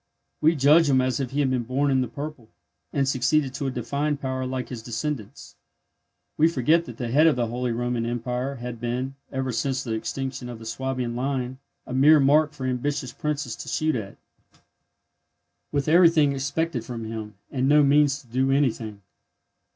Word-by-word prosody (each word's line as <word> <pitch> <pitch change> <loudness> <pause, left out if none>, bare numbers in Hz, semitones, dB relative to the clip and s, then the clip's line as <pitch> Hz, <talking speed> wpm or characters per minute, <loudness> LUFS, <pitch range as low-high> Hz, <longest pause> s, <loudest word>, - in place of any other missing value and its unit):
We 160 +2 +4
judge 150 +3 +5
him 130 -1 +4
as 130 -1 0
if 135 -3 -2
he 140 +3 0
had 135 -2 +1
been 125 -2 +1
born 135 +4 0
in 130 -1 +3
the 125 - -1
purple 140 -2 -7 0.4
and 140 -1 +1
succeeded 135 +1 +1
to 140 - -3
a - - +1
defined 140 +4 -2
power 130 -1 -3
like 130 -1 -4
his 120 -3 -6
descendants. 120 0 -5 0.8
We 160 - +5
forget 165 +2 +2
that - - -9
the 120 -5 -3
head 150 +5 +5
of 160 - +4
the 120 -1 0
Holy 120 +2 -2
Roman 120 0 -1
Empire 125 +3 -2
had 120 -2 -6
been, 125 +3 -2 0.2
ever 130 -1 -2
since 130 +3 -1
the 115 - -5
extinction 130 +2 -4
of 120 - -7
the 115 - -11
Swabian 125 0 -3
line, 130 0 -2 0.3
a - - -7
mere 145 +4 +6
mark 150 +2 +4
for 135 -3 -6
ambitious 130 +1 -2
princes 145 -6 -3
to - - -7
shoot 155 0 0
at, 105 -5 -5 1.5
with 140 -2 -1
everything 165 -3 +5
expected 140 -1 -2
from 115 -1 -6
him, 110 -2 -6 0.2
and 130 0 0
no 150 0 +6
means 145 0 +4
to - - -24
do 130 +3 0
anything. 115 -7 0
130 Hz, 185 wpm, -25 LUFS, 120-145 Hz, 1.5 s, mere